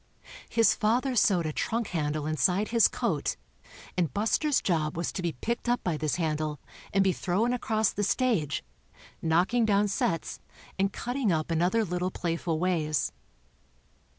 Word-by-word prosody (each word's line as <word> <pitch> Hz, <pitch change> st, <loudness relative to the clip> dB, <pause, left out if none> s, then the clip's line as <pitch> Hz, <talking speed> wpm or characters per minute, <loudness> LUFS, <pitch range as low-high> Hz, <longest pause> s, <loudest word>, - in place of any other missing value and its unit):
His 230 Hz, -1 st, +4 dB
father 245 Hz, +4 st, +1 dB
sewed 185 Hz, -7 st, +3 dB
a 155 Hz, -, -2 dB
trunk 230 Hz, +6 st, -1 dB
handle 150 Hz, -3 st, -2 dB
inside 180 Hz, +6 st, +1 dB
his 230 Hz, -1 st, +5 dB
coat -, -, -1 dB, 0.6 s
and 170 Hz, -6 st, 0 dB
Buster's 240 Hz, -, +1 dB
job 160 Hz, -4 st, -1 dB
was 170 Hz, -, -1 dB
to 185 Hz, -, -4 dB
be 170 Hz, -2 st, -1 dB
picked 235 Hz, -, -3 dB
up 245 Hz, -, +1 dB
by 175 Hz, -3 st, 0 dB
this 155 Hz, -1 st, -1 dB
handle 155 Hz, -3 st, -2 dB, 0.3 s
and 195 Hz, 0 st, +3 dB
be 190 Hz, -, +3 dB
thrown 205 Hz, +9 st, 0 dB
across 220 Hz, -3 st, +1 dB
the 205 Hz, -, -3 dB
stage, 205 Hz, -, +1 dB, 0.6 s
knocking 180 Hz, +9 st, +2 dB
down 205 Hz, -1 st, +3 dB
sets 170 Hz, -4 st, -1 dB, 0.4 s
and 195 Hz, +1 st, +2 dB
cutting 245 Hz, -1 st, -1 dB
up 160 Hz, 0 st, -1 dB
in 165 Hz, 0 st, +1 dB
other 215 Hz, +6 st, +2 dB
little 180 Hz, 0 st, -1 dB
playful 170 Hz, -2 st, -2 dB
ways. 155 Hz, -5 st, 0 dB
180 Hz, 155 wpm, -28 LUFS, 160-220 Hz, 0.6 s, his